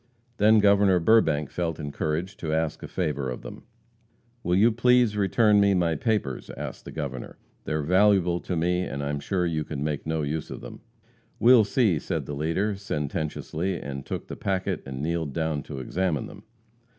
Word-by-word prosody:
Then 110 +2 +5
Governor 100 -2 +5
Burbank 80 -6 +3
felt 85 -2 -2
encouraged 75 +5 -3
to 80 - -3
ask 80 -1 -1
a - - -6
favor 75 -7 -2
of 60 - -6
them. - - -10 0.8
"Will 90 -5 +1
you 110 +5 +5
please 120 -1 +3
return 105 +1 +3
me 100 -1 +4
my 85 -2 +2
papers?" 80 - -1
asked - - -7
the - - -8
Governor. 70 -5 -6 0.3
"They - - -2
are 75 -1 -1
valuable 90 0 +3
to 90 - -4
me, 90 +2 +1
but 70 - -5
I 70 - -2
am 75 - -2
sure 90 +4 -1
you 80 -2 -1
can 75 -2 -5
make 75 0 -3
no 80 -1 -1
use 75 +2 -3
of - - -7
them." - - -10 0.6
"We'll 120 -2 +6
see," 100 - +2
said - - -3
the 75 - -5
leader, 85 +8 -1
sententiously, 85 0 -3
and 70 -1 -6
took - - -5
the - - -6
packet 95 -2 -2
and 65 +1 -5
kneeled 80 -3 -2
down 80 -2 -1
to 70 - -7
examine 80 +4 -1
them. - - -12
85 Hz, 185 wpm, -26 LUFS, 75-100 Hz, 0.8 s, We'll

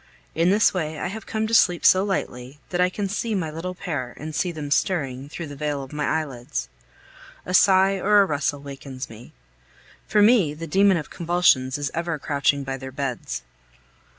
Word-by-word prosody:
In 165 +2 +2
this 205 +3 +4
way 160 -4 -3
I 175 - -3
have 220 +3 -8
come 220 0 -1
to 225 - -4
sleep 175 -6 +4
so 185 +1 +6
lightly, 135 -9 -4
that 180 0 0
I 180 - +4
can 200 +2 -3
see 215 +3 -2
my 165 -5 -2
little 175 +4 -5
pair 140 -9 -4
and 155 +1 -7
see 180 +3 0
them 150 -3 -6
stirring, 140 -6 0
through 170 +2 -6
the 145 -2 -9
veil 145 -1 -2
of 135 - -11
my 150 -1 -1
eyelids. 140 - -3 0.8
A 180 - -4
sigh 190 +1 +5
or 205 +1 +5
a - - +1
rustle 145 -3 -1
wakens 135 -2 -8
me. 115 +2 -12 0.8
For 210 0 +4
me, 205 -10 +4
the 165 +2 -6
demon 195 +3 +4
of 155 - -6
convulsions 165 -7 +2
is 145 -1 -3
ever 170 -1 -2
crouching 140 -1 0
by 135 0 -4
their 130 0 -8
beds. 130 - -4
155 Hz, 195 wpm, -24 LUFS, 140-185 Hz, 0.8 s, so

